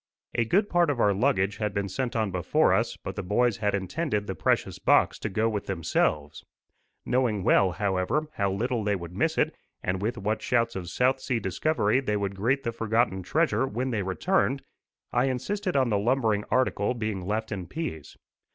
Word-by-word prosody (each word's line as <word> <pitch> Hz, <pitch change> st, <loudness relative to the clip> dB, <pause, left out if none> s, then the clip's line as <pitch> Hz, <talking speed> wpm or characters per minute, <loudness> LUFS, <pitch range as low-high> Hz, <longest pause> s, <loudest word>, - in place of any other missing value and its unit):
A 120 Hz, -, +1 dB
good 200 Hz, -, +2 dB
part 175 Hz, -3 st, +2 dB
of 140 Hz, -4 st, -1 dB
our 105 Hz, -3 st, +4 dB
luggage 100 Hz, -3 st, +1 dB
had 105 Hz, -3 st, -2 dB
been 100 Hz, -1 st, -1 dB
sent 120 Hz, +6 st, -3 dB
on 110 Hz, -3 st, 0 dB
before 90 Hz, -2 st, +2 dB
us, -, -, 0 dB
but -, -, -7 dB
the -, -, -3 dB
boys 105 Hz, +4 st, +1 dB
had 105 Hz, -1 st, 0 dB
intended 105 Hz, -, -2 dB
the 95 Hz, -, -3 dB
precious -, -, 0 dB
box -, -, +3 dB
to 105 Hz, -, -3 dB
go 110 Hz, +3 st, +1 dB
with 105 Hz, -3 st, -3 dB
themselves. 75 Hz, -4 st, -1 dB, 0.6 s
Knowing 120 Hz, -6 st, +1 dB
well, 95 Hz, 0 st, +4 dB
however, 100 Hz, -, 0 dB
how 100 Hz, -2 st, 0 dB
little 115 Hz, +3 st, -1 dB
they 105 Hz, 0 st, +1 dB
would 85 Hz, -2 st, -7 dB
miss -, -, 0 dB
it, -, -, +1 dB, 0.3 s
and 90 Hz, +1 st, -1 dB
with 115 Hz, +4 st, -1 dB
what 105 Hz, +2 st, -1 dB
shouts 115 Hz, -1 st, +1 dB
of 90 Hz, -3 st, -5 dB
south 130 Hz, +1 st, +2 dB
sea 125 Hz, -2 st, -1 dB
discovery 110 Hz, -, +1 dB
they 105 Hz, -6 st, -1 dB
would 100 Hz, -1 st, -2 dB
greet 130 Hz, +8 st, 0 dB
the 115 Hz, -, -1 dB
forgotten 115 Hz, -3 st, 0 dB
treasure 150 Hz, -, +1 dB
when 130 Hz, +2 st, -2 dB
they 110 Hz, -4 st, 0 dB
returned, 135 Hz, -, 0 dB, 0.5 s
I 125 Hz, -, +2 dB
insisted 180 Hz, -, -2 dB
on 130 Hz, -3 st, +3 dB
the 100 Hz, -, +2 dB
lumbering 110 Hz, -2 st, +1 dB
article 125 Hz, -2 st, +1 dB
being 110 Hz, -4 st, -3 dB
left 110 Hz, +4 st, -2 dB
in 95 Hz, -4 st, -4 dB
peace. 105 Hz, -, -6 dB
110 Hz, 195 wpm, -27 LUFS, 100-130 Hz, 0.6 s, our